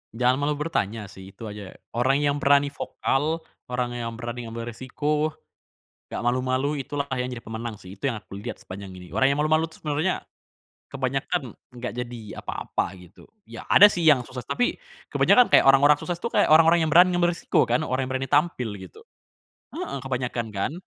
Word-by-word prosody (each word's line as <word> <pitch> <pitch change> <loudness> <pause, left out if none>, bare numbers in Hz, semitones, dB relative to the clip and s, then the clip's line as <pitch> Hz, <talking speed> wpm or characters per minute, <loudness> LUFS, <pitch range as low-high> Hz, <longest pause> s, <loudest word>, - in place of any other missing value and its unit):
Jangan 125 +3 +2
malu 145 +1 0
bertanya 110 - -3
sih, 95 0 -13
itu 115 - -11
aja. 105 -2 -9 0.2
Orang 135 +4 +1
yang 145 0 +1
berani 140 -1 +3
vokal, 155 +3 -1 0.2
orang 125 -1 -2
yang 115 -1 -4
berani 120 0 -6
ngambil 115 +1 -6
resiko, 150 +6 -2 0.7
nggak - - -4
malu-malu, 130 +4 0
itulah 140 +1 -4
kayaknya 130 -1 -1
yang 125 - -5
jadi - - -23
pemenang 115 0 -5
sih. 95 +2 -11
Itu 135 +7 -1
yang 110 - -7
aku 100 - -10
lihat 110 +4 -7
sepanjang 95 0 -9
ini. 90 -1 -11
Orang 115 +7 +1
yang 145 - -3
malu-malu 155 +1 +2
tuh 160 - -16
sebenarnya 155 +4 -1 0.7
kebanyakan 135 -2 -2 0.2
nggak 125 +1 -5
jadi 120 0 -5 0.2
apa-apa, - - -3
gitu. 90 0 -17 0.2
Ya - - -9
ada 205 - +9
sih 180 -4 +3
yang 145 -6 +5
sukses, 125 -1 -8
tapi 245 0 0 0.4
kebanyakan 250 - +6
kayak - - +7
orang-orang 145 +2 +6
sukses 175 -1 -3
itu 235 +7 -4
kayak - - +3
orang-orang 165 +2 +6
yang - - -1
berani 180 +2 +7
ngambil 175 0 +3
resiko - - +1
kan, 160 - +1
orang 130 -1 -1
yang - - -5
berani 135 0 -5
tampil 145 -6 +2
gitu. 95 - -13 0.7
Heeh 140 - -4
kebanyakan 125 -2 -2
kan? 100 +8 -1
130 Hz, 185 wpm, -25 LUFS, 115-150 Hz, 0.7 s, ada